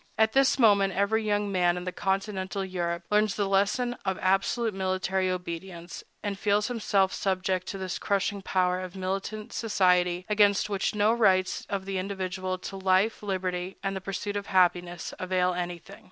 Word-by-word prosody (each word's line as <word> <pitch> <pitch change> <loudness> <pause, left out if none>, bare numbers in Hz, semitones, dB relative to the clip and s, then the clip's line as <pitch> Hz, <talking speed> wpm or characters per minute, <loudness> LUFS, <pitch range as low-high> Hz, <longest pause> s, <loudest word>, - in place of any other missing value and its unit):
At 220 0 +3
this 270 0 +4
moment 200 -6 +4
every 215 +3 +1
young 205 -1 0
man 180 -2 +2
in 180 - -5
Continental 195 0 -2
Europe 170 -2 -3
learns 210 -1 +3
the 200 -2 0
lesson 205 +6 +1
of 190 -1 -1
absolute 195 +4 +1
military 190 0 0
obedience, 175 -1 -6 0.2
and 200 -2 -3
feels 210 +1 +1
himself 200 -5 +1
subject 185 -1 -1
to 195 - -4
this 185 -2 -4
crushing 200 0 0
power 185 -1 +1
of 185 0 -7
militant 195 +3 -4
society, 180 -4 +2
against 210 -1 +3
which 200 +1 -1
no 210 +2 +3
rights 190 -5 +2
of 195 -1 -3
the 195 -1 -2
individual 185 -1 -3
to 195 +1 -7
life, 190 +3 +2
liberty, 185 -2 -3
and 195 0 -1
the 190 - -4
pursuit 195 +2 -4
of 200 -1 -3
happiness 175 -2 +1
avail 185 0 +1
anything. 175 -1 -6
190 Hz, 165 wpm, -27 LUFS, 185-205 Hz, 0.2 s, this